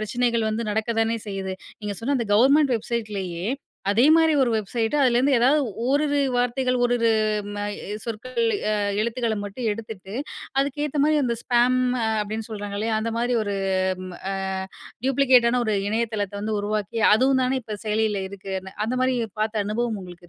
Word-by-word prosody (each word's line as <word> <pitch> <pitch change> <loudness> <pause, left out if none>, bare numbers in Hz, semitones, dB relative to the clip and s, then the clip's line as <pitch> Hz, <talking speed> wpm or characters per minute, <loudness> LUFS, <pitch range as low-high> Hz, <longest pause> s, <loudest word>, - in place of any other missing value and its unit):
பிரச்சனைகள் 230 +1 0
வந்து 215 0 -2
நடக்கத்தானே 225 +1 0
செய்யுது. 190 -1 -4 0.3
நீங்க 205 -2 -4
சொன்ன 275 +4 +1
அந்த 235 - -2
கவர்மெண்ட் 270 +3 +5
வெப்சைட்லேயே, 205 -6 -4 0.4
அதே 230 +6 +4
மாரி 320 -1 +4
ஒரு 245 - +2
வெப்சைட்டு. 225 +5 -1
அதுலேருந்து 260 +2 +3
ஏதாவது 270 +6 +4 0.3
ஓரிரு 285 +1 +2 0.2
வார்த்தைகள், 250 +1 +1
ஓரிரு 240 -2 +2 0.4
ம - - -5 0.5
சொற்கள், 235 +2 -4 0.3
அ - - +1 0.3
எழுத்துக்கள 230 0 -1
மட்டும் 220 +3 -3
எடுத்துட்டு, 215 -3 -8 0.5
அதுக்கு 285 +1 -1
ஏத்த 290 0 -2
மாதிரி 305 -1 +3
அந்த 235 -2 0
ஸ்பேம் 245 +1 +3 0.4
அப்படீன்னு 215 +2 -4
சொல்றாங்கல்லையா, 210 +1 -2
அந்த 230 +1 -2
மாரி 240 0 +1
ஒரு 205 -1 -2 0.5
ம் 180 - -8 0.2
அ - - -2 0.7
டூயூப்ளிகேட்டான 250 -2 +4
ஒரு 215 - +1
இணையதளத்தை 215 -2 -2
வந்து 210 0 -1
உருவாக்கி, 210 +2 -2
அதுவும் 260 +3 +3
தான 260 +1 +1
இப்ப 215 -2 -6
செயலியில 215 -1 +1
இருக்குன்னு, 190 -1 -6
அந்த 250 +2 -1
மாரி 260 0 +2 0.3
பார்த்த 215 -1 0
அனுபவம் 220 0 -1
உங்களுக்கு 175 -1 -12
230 Hz, 150 wpm, -24 LUFS, 210-250 Hz, 0.7 s, கவர்மெண்ட்